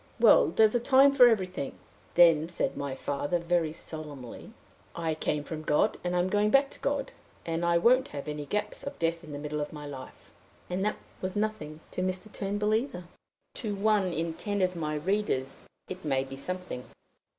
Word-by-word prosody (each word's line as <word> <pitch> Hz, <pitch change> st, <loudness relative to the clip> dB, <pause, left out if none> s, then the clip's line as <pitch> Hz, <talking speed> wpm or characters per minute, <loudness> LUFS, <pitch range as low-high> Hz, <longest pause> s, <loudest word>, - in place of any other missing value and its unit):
'Well! -, -, +7 dB
there's 220 Hz, -1 st, +4 dB
a 240 Hz, -, +3 dB
time 270 Hz, +3 st, +6 dB
for 255 Hz, -3 st, +8 dB
everything.' 185 Hz, -, -1 dB, 0.4 s
Then 165 Hz, -2 st, +6 dB
said 175 Hz, -, 0 dB
my 140 Hz, -2 st, -3 dB
father, 145 Hz, +5 st, -1 dB
very 170 Hz, -2 st, 0 dB
solemnly, 150 Hz, -6 st, -8 dB, 0.4 s
'I 165 Hz, -1 st, -1 dB
came 150 Hz, -1 st, -1 dB
from 155 Hz, +1 st, -6 dB
God, 150 Hz, -1 st, +2 dB
and 180 Hz, 0 st, -1 dB
I'm 180 Hz, +1 st, +2 dB
going 205 Hz, +2 st, +2 dB
back 275 Hz, +3 st, +4 dB
to -, -, -11 dB
God, 280 Hz, -1 st, -1 dB, 0.3 s
and 165 Hz, 0 st, -2 dB
I 170 Hz, 0 st, +3 dB
won't 255 Hz, +9 st, +4 dB
have 145 Hz, 0 st, -7 dB
any 150 Hz, -1 st, -4 dB
gaps 210 Hz, +5 st, -2 dB
of 280 Hz, 0 st, -6 dB
death 165 Hz, 0 st, -1 dB
in 155 Hz, -, -10 dB
the 145 Hz, -, -5 dB
middle 150 Hz, +1 st, -3 dB
of 145 Hz, -, -4 dB
my 150 Hz, -1 st, -8 dB
life.' 135 Hz, -3 st, -10 dB, 0.4 s
And 185 Hz, +2 st, -1 dB
that 210 Hz, -, +1 dB, 0.3 s
was 185 Hz, +1 st, -3 dB
nothing 185 Hz, -8 st, -3 dB
to -, -, -3 dB
Mr. 185 Hz, +3 st, -2 dB
Turnbull 205 Hz, +1 st, -1 dB
either." 220 Hz, -5 st, -1 dB, 0.5 s
To 210 Hz, -4 st, -4 dB
one 200 Hz, -2 st, +2 dB
in 165 Hz, 0 st, -2 dB
ten 205 Hz, +2 st, -1 dB
of 185 Hz, 0 st, +1 dB
my 155 Hz, -2 st, -2 dB
readers 150 Hz, -5 st, -1 dB, 0.2 s
it 185 Hz, 0 st, -7 dB
may 135 Hz, -3 st, +1 dB
be 135 Hz, 0 st, -8 dB
something. 180 Hz, -2 st, -5 dB
175 Hz, 190 wpm, -29 LUFS, 150-210 Hz, 0.5 s, for